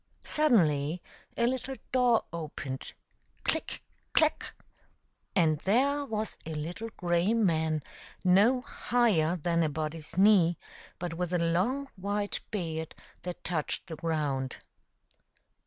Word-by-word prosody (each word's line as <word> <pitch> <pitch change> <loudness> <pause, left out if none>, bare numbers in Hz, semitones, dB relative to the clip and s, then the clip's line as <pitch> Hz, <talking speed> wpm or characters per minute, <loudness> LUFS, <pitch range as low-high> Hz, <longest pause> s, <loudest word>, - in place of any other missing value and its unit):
Suddenly 170 - +2 0.4
a 235 - +3
little 260 +2 -1 0.2
door 245 -3 +4
opened 150 -5 -5 0.2
— - - -34
click! - - -1 0.3
clack! - - +2 0.4
— - - -45
and 155 -3 +3
there 275 - +2
was, 220 -4 -3
a 160 -1 -5
little 175 +9 -4
grey 175 +4 +2
man 160 -8 +1 0.4
no 205 +8 +5
higher 225 - +2
than 170 0 +1
a 160 - +2
body's 155 +2 -4
knee, 190 -4 +6 0.4
but 175 -2 -4
with 175 +1 -2
a - - +4
long 185 +12 +1
white 205 +2 -1
beard 160 -6 -3 0.3
that 180 -1 -6
touched 160 -3 -1
the 165 - -6
ground. 150 -5 -1
175 Hz, 125 wpm, -30 LUFS, 160-220 Hz, 0.4 s, knee